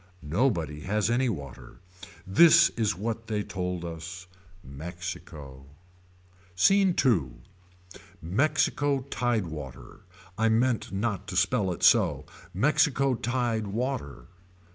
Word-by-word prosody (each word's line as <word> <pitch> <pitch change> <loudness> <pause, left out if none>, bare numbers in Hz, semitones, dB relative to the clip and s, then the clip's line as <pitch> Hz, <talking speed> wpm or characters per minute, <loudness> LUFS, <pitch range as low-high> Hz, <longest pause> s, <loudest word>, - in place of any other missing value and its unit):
Nobody 80 - 0
has 105 +6 -1
any 125 +1 +1
water. 70 - -8 0.5
This 170 - +6
is 110 -3 -1
what 115 +4 -4
they 105 -2 -2
told 90 -3 -4
us. 85 +2 -7 0.4
Mexico. 75 -3 -8 0.9
SCENE 195 - +4
II. 85 - +2 0.9
Mexico 140 - 0
tide 120 -5 0
water. 70 -6 -9 0.4
I 115 0 +3
meant 115 +1 +1
not 100 0 -3
to 95 - -6
spell 95 +1 +1
it 90 - -6
so. - - +4 0.3
Mexico 135 - +2
tied 120 -2 -1
water. 100 - -4
100 Hz, 105 wpm, -27 LUFS, 85-120 Hz, 0.9 s, This